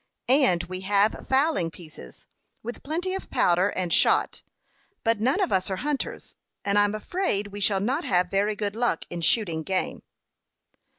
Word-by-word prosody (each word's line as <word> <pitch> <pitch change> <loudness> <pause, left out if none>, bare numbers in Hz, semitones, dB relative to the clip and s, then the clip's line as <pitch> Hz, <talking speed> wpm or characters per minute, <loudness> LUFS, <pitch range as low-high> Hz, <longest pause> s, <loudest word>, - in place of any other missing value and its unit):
"And 255 -11 +4
we 185 +1 -6
have 200 +2 +1
fowling 265 - +2
pieces, 155 - -12 0.4
with 240 +2 -6
plenty 345 +6 -2
of 385 - -5
powder 180 +3 +3
and 180 -4 -2
shot; - - +2 0.6
but 225 -1 +1
none 260 - +2
of 380 - 0
us 190 +1 +1
are 190 - -1
hunters, 295 - -4 0.3
and 200 0 +3
I'm 205 +1 +2
afraid 215 - -2
we 205 +1 -7
shall 200 -1 +2
not 265 - -1
have 180 -1 +1
very 205 +2 +1
good 205 0 -3
luck 235 -7 0
in 175 -1 -4
shooting 170 -3 +1
game." 185 +3 -2
205 Hz, 165 wpm, -25 LUFS, 185-260 Hz, 0.6 s, And